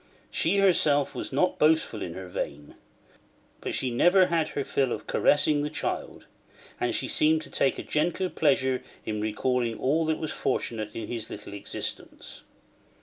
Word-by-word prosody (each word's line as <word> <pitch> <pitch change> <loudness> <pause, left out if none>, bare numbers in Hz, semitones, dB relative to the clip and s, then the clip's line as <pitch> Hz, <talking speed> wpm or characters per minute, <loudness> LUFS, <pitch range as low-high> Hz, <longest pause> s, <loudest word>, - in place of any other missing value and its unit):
She 180 +5 +1
herself 155 -7 +3
was - - -5
not 145 +7 +1
boastful 155 -7 +2
in 85 - -5
her 95 -1 -7
vein; 75 -4 -5 0.9
but - - -4
she 130 - -1
never 175 +10 +5
had 165 -2 +1
her 140 - -3
fill 135 -1 0
of - - -4
caressing 145 0 +3
the 150 - -2
child; 155 - -4 0.5
and - - 0
she - - 0
seemed 155 +1 +3
to - - -12
take 135 - +2
a - - -5
gentle 175 +4 0
pleasure 130 -4 +2 0.2
in 105 -1 -2
recalling 115 +2 0
all 155 +4 +1
that 160 -1 +1
was 155 - -4
fortunate 110 -4 -2
in 115 - -5
his 115 -3 -5
little - - -8
existence. 100 - -6
140 Hz, 165 wpm, -27 LUFS, 115-160 Hz, 0.9 s, never